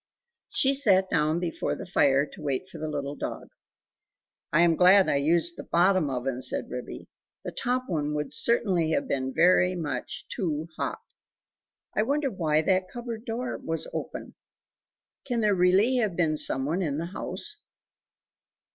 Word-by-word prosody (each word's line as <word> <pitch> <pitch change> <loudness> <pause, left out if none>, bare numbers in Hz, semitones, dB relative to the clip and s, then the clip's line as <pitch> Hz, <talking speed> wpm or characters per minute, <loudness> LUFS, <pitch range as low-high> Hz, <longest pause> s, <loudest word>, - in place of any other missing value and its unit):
She 270 +1 +3
sat 195 -9 +4
down 155 +2 +2
before 175 -2 -2
the - - -8
fire 140 -5 +3
to - - -13
wait 145 +4 -2
for 165 - -9
the 155 - -3
little 145 -2 -3
dog. - - -6 1.0
"I 150 - +4
am 170 -1 +4
glad 185 +3 +6
I 140 - +2
used 170 +4 +1
the - - -6
BOTTOM 180 -2 +2
oven," 130 0 -3
said - - -1
Ribby, 125 0 -7 0.4
"the - - -5
top 250 0 -1
one 150 -3 -2
would 150 0 -3
certainly 190 -9 +1
have 280 -1 0
been 130 - -1
very 180 +3 +4
much 145 -7 -4
too 160 -6 -3
hot. - - -3 1.0
I - - +3
wonder 280 +4 0
why 155 -4 +1
that 185 +1 +1
cupboard 235 -1 -6
door 250 +1 -3
was 165 0 -4
open? - - -6 0.9
Can 245 -4 -1
there 210 -1 +3
really 190 +7 +3
have 215 -7 0
been 160 -3 +1
some 135 -3 +1
one 165 +6 -1
in 145 -5 -1
the 165 - -3
house?" - - -4
175 Hz, 165 wpm, -27 LUFS, 150-200 Hz, 1.0 s, glad